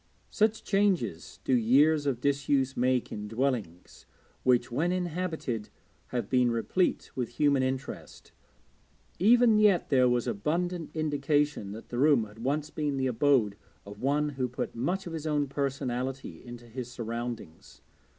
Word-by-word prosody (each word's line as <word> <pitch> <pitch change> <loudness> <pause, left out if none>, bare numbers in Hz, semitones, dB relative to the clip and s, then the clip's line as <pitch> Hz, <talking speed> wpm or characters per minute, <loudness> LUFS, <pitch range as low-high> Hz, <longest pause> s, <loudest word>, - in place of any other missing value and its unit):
Such 215 0 +1
changes 185 - 0
do - - +1
years 145 +6 +4
of 130 -4 0
disuse 140 -1 +1
make 125 0 +1
in 105 0 -5
dwellings 110 -7 -3 0.3
which, 125 -1 +2
when 160 +8 +1
inhabited, 170 - -3 0.4
have 120 -5 -3
been 125 0 +3
replete 120 +10 0
with 125 -3 -2
human 145 -3 +3
interest. 130 +1 -5 0.9
Even 230 +2 +5
yet 205 -7 +3
there 130 -2 +5
was 120 -1 +1
abundant 165 - -2
indication 145 -6 0
that 110 - -10
the 120 - -3
room 140 -4 +5
had 105 +1 -12
once 145 +5 -1
been 150 -3 -2
the 135 - 0
abode 125 -4 +2 0.3
of 100 0 -11
one 145 +3 +1
who 130 -3 -2
put 125 - -4
much 175 +11 -1
of 170 - -6
his 160 -1 -4
own 150 -1 +1
personality 135 - -3
into 120 -1 -10
his 120 +1 -7
surroundings. 115 -7 -6
135 Hz, 145 wpm, -29 LUFS, 120-150 Hz, 0.9 s, Even